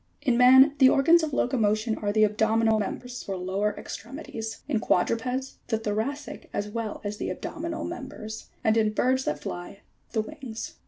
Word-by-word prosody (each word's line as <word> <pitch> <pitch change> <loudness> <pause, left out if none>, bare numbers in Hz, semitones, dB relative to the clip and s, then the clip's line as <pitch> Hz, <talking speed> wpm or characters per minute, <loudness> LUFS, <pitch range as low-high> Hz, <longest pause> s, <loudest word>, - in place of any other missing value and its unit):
88. 250 - +3
In - - +1
man 260 +3 +8
the 260 -2 +8
organs 330 +6 +5
of 315 -1 -2
locomotion 220 -4 +1
are 205 -1 -1
the 215 +1 +4
abdominal 220 +1 +2
mem 205 - -2
bers, 245 -1 -8
or 190 - -2
lower 190 +3 -1
extremities; 225 -1 -7
in 265 -7 +1
quadrupeds 250 +8 0
the 225 - +1
thoracic 225 +7 -4
as 205 - -2
well 220 -1 -4
as 205 0 -4
the - - -3
abdominal 325 0 -4
members; 245 -9 -7
and 220 -1 +3
in 215 -1 +2
birds 260 +4 +1
that 150 0 -2
fly, 175 +3 -6 0.3
the 220 - +2
wings. 255 -3 -7
225 Hz, 175 wpm, -27 LUFS, 215-265 Hz, 0.3 s, man